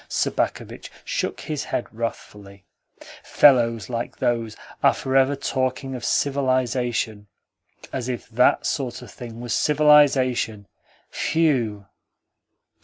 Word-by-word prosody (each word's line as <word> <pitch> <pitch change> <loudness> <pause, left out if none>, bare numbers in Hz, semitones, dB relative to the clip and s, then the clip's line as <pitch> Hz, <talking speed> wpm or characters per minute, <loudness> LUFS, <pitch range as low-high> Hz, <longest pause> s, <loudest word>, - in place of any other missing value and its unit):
Sobakevitch - - -2 0.2
shook - - -3
his 150 -2 -4
head - - -2
wrathfully. 105 -3 -7 0.6
"Fellows 115 -6 +4
like 120 -1 -4
those 115 -2 -1 0.2
are - - +4
for 130 0 -3
ever 135 +1 +4
talking 135 -1 -2
of 125 - -6
civilisation. 125 -6 0 0.7
As 130 -1 -3
if 125 - -5
THAT 125 +2 +2
sort 130 -4 -3
of - - -12
thing 120 -2 -9
was 120 -1 -3
civilisation! 140 -8 +3 0.5
Phew!" 125 -11 0
125 Hz, 110 wpm, -23 LUFS, 115-135 Hz, 0.7 s, Fellows